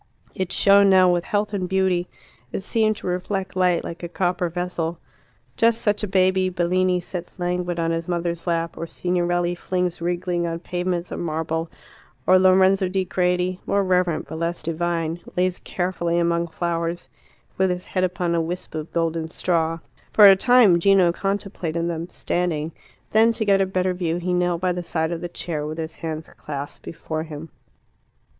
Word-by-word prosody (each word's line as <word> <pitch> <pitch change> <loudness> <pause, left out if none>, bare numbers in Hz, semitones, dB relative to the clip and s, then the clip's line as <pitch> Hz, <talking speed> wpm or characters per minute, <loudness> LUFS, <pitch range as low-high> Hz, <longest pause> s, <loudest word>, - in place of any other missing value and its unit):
It 185 -2 -3
shone 200 0 +5
now 185 -1 +6
with 175 -1 0
health 210 0 -1
and 185 -3 -2
beauty: 190 -2 +1 0.4
it - - -3
seemed 215 +1 +1
to - - -10
reflect 185 +2 -2
light, 180 -2 +2
like 170 - -7
a 170 - -5
copper 180 0 0
vessel. 175 -1 -3 0.6
Just 230 0 +3
such 210 -1 +1
a 210 - -1
baby 185 0 +2
Bellini 180 +1 +1
sets 175 +1 -7
languid 175 -1 -2
on 165 0 0
his 165 0 -2
mother's 170 0 -2
lap, 165 -1 -1
or 165 - -4
Signorelli 175 0 0
flings 180 -1 -2
wriggling 175 0 -1
on 165 0 -2
pavements 175 0 -3
of - - -4
marble, 160 0 -2 0.6
or 185 0 +6
Lorenzo 190 +1 +4
di 190 0 0
Credi, 180 0 0
more 200 0 +2
reverent 180 -3 +1
but 160 - -6
less 170 +1 -2
divine, 165 0 -1 0.2
lays 180 0 +1
carefully 175 -2 -2
among 170 0 +1
flowers, 170 0 -3 0.5
with 190 0 +3
his 180 0 -3
head 185 - -1
upon 180 -1 0
a 170 - +2
wisp 175 +3 -5
of 155 0 -5
golden 165 -1 -1
straw. 165 -1 0 0.4
For 210 - +8
a 195 -1 +10
time 215 -4 +5
Gino 190 -1 +5
contemplated 185 -4 -2
them 170 0 -4
standing. 165 -4 -2 0.4
Then, 225 +1 +5
to 220 -1 -2
get 195 -1 +4
a 190 - +2
better 185 0 0
view, 175 -2 -1
he 180 +1 -2
knelt 180 -1 +1
by 185 -1 +1
the 180 0 -3
side 160 -1 -2
of 170 - -4
the 175 - -4
chair, 170 -3 -4
with 155 +1 -5
his 160 0 -4
hands 160 -1 -5
clasped 145 -1 -7
before 155 -1 -5
him. 160 0 -8
175 Hz, 175 wpm, -23 LUFS, 170-185 Hz, 0.6 s, a